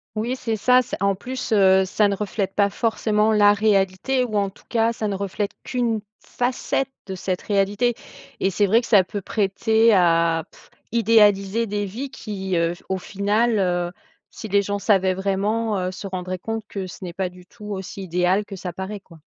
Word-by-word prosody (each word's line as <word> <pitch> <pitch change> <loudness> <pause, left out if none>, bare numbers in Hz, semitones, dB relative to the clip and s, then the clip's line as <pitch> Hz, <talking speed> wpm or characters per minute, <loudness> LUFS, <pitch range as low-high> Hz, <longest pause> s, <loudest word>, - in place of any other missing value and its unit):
Oui 235 +4 -1
c'est 225 -3 -2
ça, 250 +4 +4
c - - -6
en 200 0 +2
plus, 255 +5 -6
heu, 190 -1 +5
ça 205 +2 +2
ne 200 - 0
reflète 195 -1 -3
pas 200 -1 +3
forcément 220 -1 +1
la 205 -1 +6
réalité. 205 +4 +1
Ou 220 -4 -4
en 200 -1 +1
tout - - -20
cas 230 -1 +2
ça 220 -2 -3
ne 200 - -2
reflète 200 +1 -3
qu'une 235 -4 -1 0.2
facette 255 +2 -2 0.2
de 190 - -6
cette 185 0 -3
réalité. 205 +4 +1 0.5
Et 190 - +2
c'est 205 +2 +2
vrai 225 +5 +4
que 235 - -8
ça 200 -5 +6
peut 200 +2 -5
prêter 220 +3 +2
à 165 -3 +3 0.5
idéaliser 215 -1 +3
des 205 0 -2
vies. 245 +8 -5
Qui, 195 -7 -4
heu, 170 0 +1 0.2
au 190 - 0
final, 205 +4 0
heu, 175 -2 0 0.4
si 220 - -8
les 200 0 +3
gens 205 +1 -2
savaient 190 -3 +3
vraiment, 200 +3 -1
heu, 185 0 -2
se 195 +2 -7
rendraient 185 -1 -4
compte 225 +3 -4
que 190 -2 -5
ce 185 - -11
n'est 175 -2 -6
pas 185 -1 -2
du 180 0 -16
tout 210 +2 -14
aussi 195 -1 -6
idéal 180 +3 +1
que 200 - -8
ça 180 -2 -6
paraît, 195 +3 -5
quoi. 165 -4 -18
200 Hz, 195 wpm, -22 LUFS, 190-220 Hz, 0.5 s, la